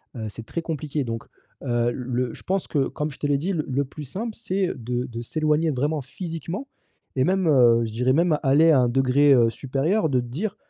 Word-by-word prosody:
Heu, 110 -2 -4
c'est 115 +2 -9
très 170 +9 -4
compliqué, 155 -3 -3
donc 115 0 -4 0.4
heu, 120 -2 +1
le 125 -1 -2
je - - -12
pense 190 0 -1
que, 140 -3 +1
comme 150 0 -3
je - - -12
te 145 - -1
l'ai 145 -1 +2
dit 180 +7 -2
le 155 -4 -2
le 140 +2 0
plus 150 +3 -9
simple 210 - -5
c'est 190 -4 -1
de 125 0 -3
de 115 0 -6
s'éloigner 155 +5 +1
vraiment, 145 +3 -1
physiquement 170 - -6 0.5
et 130 - +3
même, 190 +1 +1
heu, 120 -4 +5
je 110 - -4
dirais 125 +4 +1
même, 165 0 +2
aller 150 +4 +5
à 145 - +5
un 120 - +3
degré, 135 +3 +4
heu, 120 -3 +5
supérieur 145 - 0
de 130 -2 +2
te - - -7
dire: 185 - -4
140 Hz, 225 wpm, -24 LUFS, 125-165 Hz, 0.5 s, heu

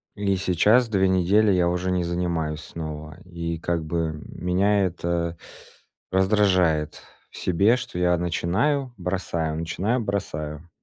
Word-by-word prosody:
и 100 -1 0
сейчас 105 +7 +3
2 95 -3 +2
недели 100 +4 +3
я 90 -2 +3
уже 90 +1 -1
не 90 -1 +1
занимаюсь 85 -3 -2
снова. 80 -1 -7
И, 85 -2 -4
как 85 -1 -1
бы, 80 -1 -2
меня 95 +3 +1
это 85 -1 -2 0.7
раздражает 95 -6 +2 0.3
в - - -12
себе, 100 +6 +3
что 120 -8 -6
я: 90 0 +3
начинаю, 100 - 0
бросаю, 85 -4 -2
начинаю, 95 +9 -1
бросаю. 80 -6 -4
90 Hz, 125 wpm, -24 LUFS, 85-100 Hz, 0.7 s, сейчас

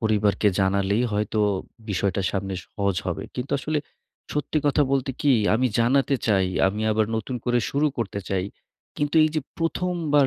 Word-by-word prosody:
পরিবারকে 105 -2 +2
জানালেই 100 +3 +2
হয়তো 105 +1 -1 0.5
বিষয়টা 100 0 0
সামনে 95 -1 -3
সহজ 100 -2 -1
হবে। - - -2
কিন্তু 125 +2 -4
আসলে, 155 +1 -1 0.5
সত্যি 150 +1 0
কথা 145 +1 +4
বলতে 135 0 +1
কি, 145 -2 +4 0.2
আমি 130 +3 +2
জানাতে 135 +4 +3
চাই। 95 -4 +3 0.2
আমি 105 +3 -1
আবার 110 0 +2
নতুন 115 +3 -3
করে 120 0 +2
শুরু 145 +2 +2
করতে 100 -3 -2
চাই। 95 -1 0 0.5
কিন্তু 145 +1 -1
এই - - +3
যে 155 - +1 0.2
১ম 180 +2 -1 0.2
বার 145 -2 +6
110 Hz, 165 wpm, -24 LUFS, 100-140 Hz, 0.5 s, বার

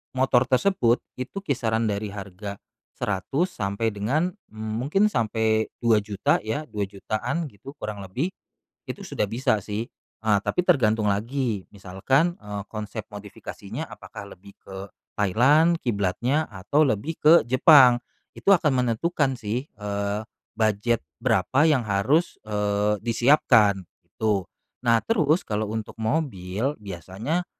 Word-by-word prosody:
motor 130 -1 +3
tersebut, 130 -4 +2 0.2
itu 165 +10 -5
kisaran 115 - 0
dari 100 +1 -3
harga 100 0 -7 0.4
Rp100.000 135 - -1
sampai 100 - -2
dengan, 130 - 0 0.2
mmm, 110 0 -6
mungkin 195 - +2
sampai 110 - +1 0.2
Rp2.000.000 105 -3 +2
ya, 110 +8 -3
Rp2.000.000-an 110 - -3
gitu, 135 +8 -12
kurang 105 -7 -6
lebih, 110 - -3 0.6
itu - - -6
sudah - - -2
bisa 115 -3 +1
sih, 105 +4 -4 0.4
eee, 105 -2 +4
tapi 180 - -1
tergantung 110 -4 +3
lagi, 110 +1 -1
misalkan, 105 - 0
eee, 105 -1 -5
konsep 110 +1 -6
modifikasinya 105 -1 -8
apakah - - -10
lebih 100 +2 -16
ke, 95 0 -9 0.3
Thailand 140 - +4
kiblatnya, 120 +7 0
atau 105 +10 +1
lebih 135 +5 -1
ke 155 - +7 0.2
Jepang. 130 -2 +7 0.3
Itu - - +1
akan 160 -7 +3
menentukan 135 +3 0
sih, 115 +3 -2 0.2
eee, 100 0 -2 0.4
budget 110 +1 +1 0.2
berapa 115 +10 +2
yang 130 -7 +2
harus, 110 - +1
eee, 105 0 0
disiapkan, 115 -3 +4 0.2
gitu. 105 -4 -1 0.4
Nah 115 -2 +4
terus, 165 -7 +2
kalau 105 0 -2
untuk 110 -1 -5
mobil, 110 - -1
biasanya, 100 - -4
110 Hz, 125 wpm, -25 LUFS, 105-135 Hz, 0.6 s, ke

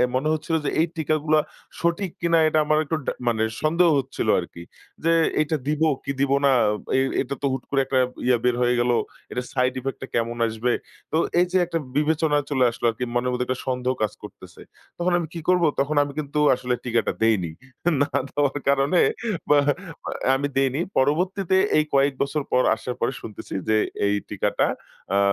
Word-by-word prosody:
মনে 135 +4 0
হচ্ছিল 155 +1 -2
যে - - +1
এই 165 - +3
টিকাগুলা 155 0 +2 0.4
সঠিক 170 +2 0
কিনা 170 -1 +3
এটা 155 0 +2
আমার 155 0 +2
একটু 160 - -1
ডা - - 0 0.2
মানে 110 -2 +2 0.2
সন্দেহ 170 +3 +3
হচ্ছিল 130 -4 -4
আরকি। 85 -1 -8 0.4
যে 165 - +3 0.3
এটা 155 +1 0
দিব 150 +1 -1 0.2
কি - - -3
দিবো 140 0 +3
না। 140 - +5 0.5
এ - - +4 0.2
এটা 140 +1 -4
তো - - -1
হুট 130 -1 -3
করে 140 - +1
একটা 130 - 0 0.3
ইয়া 125 - +4
বের 125 -1 +2
হয়ে 125 0 +3
গেল। 120 0 +2 0.4
এটার 125 0 -4
সাইড 125 -1 +2
ইফেক্ট 135 +1 -4
টা 130 - -5
কেমন 115 0 -1
আসবে। 115 +2 -1 0.4
তো 160 - +1 0.2
এই 180 - +5
যে 185 - +3
একটা 170 -1 -2 0.2
বিবেচনায় 150 -1 +1
চলে 130 -3 +2
আসলো 120 - -5
আরকি 120 +3 -4
মনের 125 +1 +1
মধ্যে 125 0 -1
একটা 130 - +1 0.2
সন্দেহ 125 0 0
কাজ 105 - -1
করতেছে। - - -12 0.4
তখন 175 +1 0
আমি 165 - -4
কি 170 - -5
করব 180 -1 +4 0.2
তখন 145 +2 0
আমি 145 - -6
কিন্তু 150 0 -2 0.2
আসলে 125 0 -2
টিকাটা 115 -2 +1
দেইনি। 100 -7 +2 0.5
না 145 - +3 0.2
দেওয়ার 145 0 0
কারণে 140 +5 +3 0.5
মা 150 - +6 0.5
মানে - - -5 0.2
আমি 140 +2 -1
দেইনি। 135 +1 +1 0.2
পরবর্তীতে 180 +7 +1 0.2
এই 155 - +4
কয়েক 140 0 +3
বছর 150 +2 -2
পর 125 - +4
আসার 125 +2 -5
পরে 120 - 0
শুনতেছি 110 - -9 0.2
যে 110 - +4 0.3
এই 100 0 +2
টিকাটা - - 0 0.5
আ - - +4
140 Hz, 190 wpm, -24 LUFS, 125-155 Hz, 0.5 s, মা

